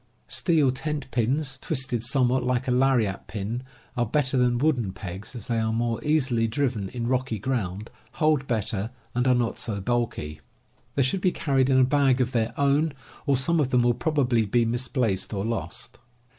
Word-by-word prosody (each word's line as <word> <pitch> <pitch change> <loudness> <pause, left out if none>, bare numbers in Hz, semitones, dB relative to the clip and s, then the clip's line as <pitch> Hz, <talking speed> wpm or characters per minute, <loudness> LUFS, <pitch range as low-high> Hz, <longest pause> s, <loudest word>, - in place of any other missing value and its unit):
Steel 155 -7 +3
tent 145 +1 -4
pins, 130 +3 0
twisted 130 -6 -2
somewhat 130 +1 +2
like 125 +1 0
a - - +1
lariat 125 -6 +2
pin, 105 +5 -4 0.3
are 120 - +1
better 130 +3 0
than 125 -1 +3
wooden 125 -7 +1
pegs, 95 +5 -7
as 115 - -6
they 115 -2 0
are 110 0 0
more 115 0 -1
easily 130 -7 +2
driven 115 -5 -1
in 120 +1 -4
rocky 130 -1 0
ground, 105 -3 -3 0.2
hold 155 -4 +1
better, 110 -2 -1 0.2
and 125 +2 +1
are 125 - +5
not 120 -2 -1
so 105 -4 -2
bulky. 95 -9 -2 0.5
They 140 - +3
should 180 +9 0
be 185 - +3
carried 135 -5 +1
in 130 - +4
a 130 - +6
bag 135 -1 +3
of 125 0 +1
their 115 -1 0
own, 140 +2 +2 0.3
or 140 -2 +3
some 160 +6 +2
of 140 -4 +1
them 125 -2 +3
will 120 0 +4
probably 130 -5 +1
be 115 +3 +2
misplaced 115 -4 -1
or 100 +1 -2
lost. 115 0 -4
125 Hz, 185 wpm, -26 LUFS, 115-135 Hz, 0.5 s, a